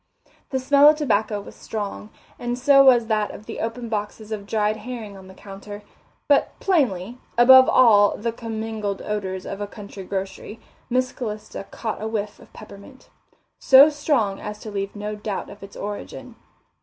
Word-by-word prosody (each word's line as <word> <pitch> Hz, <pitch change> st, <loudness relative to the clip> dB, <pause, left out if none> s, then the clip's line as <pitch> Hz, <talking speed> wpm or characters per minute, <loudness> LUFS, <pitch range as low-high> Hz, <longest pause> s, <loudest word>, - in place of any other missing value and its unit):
The 265 Hz, -, -1 dB
smell 280 Hz, +3 st, +6 dB
of 305 Hz, -, +4 dB
tobacco 220 Hz, -7 st, 0 dB
was 200 Hz, -, -11 dB
strong, 210 Hz, -1 st, -6 dB, 0.3 s
and 240 Hz, 0 st, -3 dB
so 275 Hz, +2 st, +6 dB
was 245 Hz, -3 st, +6 dB
that 215 Hz, -2 st, 0 dB
of 210 Hz, -, -11 dB
the -, -, -7 dB
open 230 Hz, +1 st, -4 dB
boxes 215 Hz, 0 st, -5 dB
of 205 Hz, -2 st, -5 dB
dried 215 Hz, 0 st, 0 dB
herring 220 Hz, -2 st, -8 dB
on 190 Hz, -1 st, -13 dB
the 190 Hz, -, -14 dB
counter, 205 Hz, +1 st, -10 dB, 0.4 s
but 285 Hz, -1 st, +2 dB
plainly, 245 Hz, -, 0 dB, 0.2 s
above 260 Hz, +2 st, +8 dB
all 210 Hz, -5 st, +5 dB
the 230 Hz, +2 st, -2 dB
commingled 220 Hz, -3 st, -5 dB
odours 190 Hz, -3 st, -4 dB
of 200 Hz, +1 st, -6 dB
a 205 Hz, -, -3 dB
country 200 Hz, -2 st, -10 dB
grocery, 195 Hz, +3 st, -6 dB, 0.3 s
Miss 255 Hz, +1 st, 0 dB
Calista 210 Hz, -4 st, -6 dB
caught 220 Hz, -3 st, -5 dB
a 220 Hz, -, -3 dB
whiff 210 Hz, -2 st, -4 dB
of -, -, -18 dB
peppermint, 215 Hz, +5 st, -14 dB, 0.5 s
so 275 Hz, +3 st, +8 dB
strong 285 Hz, -10 st, 0 dB
as 210 Hz, 0 st, -6 dB
to 215 Hz, -, -8 dB
leave 195 Hz, 0 st, -4 dB
no 210 Hz, +1 st, -5 dB
doubt 210 Hz, -1 st, -5 dB
of 205 Hz, -, -13 dB
its 195 Hz, 0 st, -12 dB
origin. 205 Hz, 0 st, -7 dB
215 Hz, 170 wpm, -23 LUFS, 205-245 Hz, 0.5 s, above